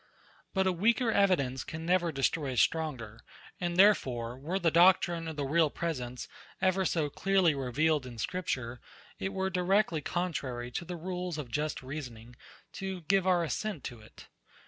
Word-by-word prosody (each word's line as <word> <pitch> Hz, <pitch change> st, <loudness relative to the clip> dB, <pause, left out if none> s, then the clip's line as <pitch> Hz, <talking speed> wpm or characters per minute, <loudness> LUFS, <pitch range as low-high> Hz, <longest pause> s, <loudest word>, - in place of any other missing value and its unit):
But 190 Hz, 0 st, +3 dB
a 190 Hz, -, +3 dB
weaker 225 Hz, +6 st, +2 dB
evidence 145 Hz, -12 st, +2 dB
can 160 Hz, +1 st, -7 dB
never 175 Hz, -1 st, +2 dB
destroy 135 Hz, 0 st, 0 dB
a -, -, -6 dB
stronger; 125 Hz, -10 st, 0 dB, 0.4 s
and 175 Hz, -1 st, -2 dB
therefore, 125 Hz, -, +3 dB
were 155 Hz, +8 st, -3 dB
the 170 Hz, -4 st, +2 dB
doctrine 175 Hz, -1 st, +4 dB
of 160 Hz, -, -5 dB
the 145 Hz, -2 st, -2 dB
real 155 Hz, +2 st, +3 dB
presence 125 Hz, -7 st, -4 dB, 0.3 s
ever 190 Hz, 0 st, +2 dB
so 160 Hz, -4 st, +1 dB
clearly 190 Hz, +2 st, +2 dB
revealed 140 Hz, +2 st, 0 dB
in 120 Hz, -2 st, -9 dB
scripture, 125 Hz, -4 st, -3 dB, 0.4 s
it 190 Hz, -, -2 dB
were 190 Hz, -1 st, -1 dB
directly 180 Hz, -2 st, +2 dB
contrary 135 Hz, -8 st, -3 dB
to 170 Hz, -, -4 dB
the 175 Hz, +1 st, -5 dB
rules 180 Hz, 0 st, -4 dB
of 135 Hz, -6 st, -6 dB
just 150 Hz, +1 st, -2 dB
reasoning 125 Hz, -4 st, -8 dB, 0.4 s
to 190 Hz, -2 st, -5 dB
give 190 Hz, +3 st, +2 dB
our 180 Hz, -2 st, +3 dB
assent 170 Hz, -1 st, -3 dB
to 120 Hz, -2 st, -7 dB
it. 110 Hz, -, -15 dB
165 Hz, 165 wpm, -30 LUFS, 135-185 Hz, 0.4 s, doctrine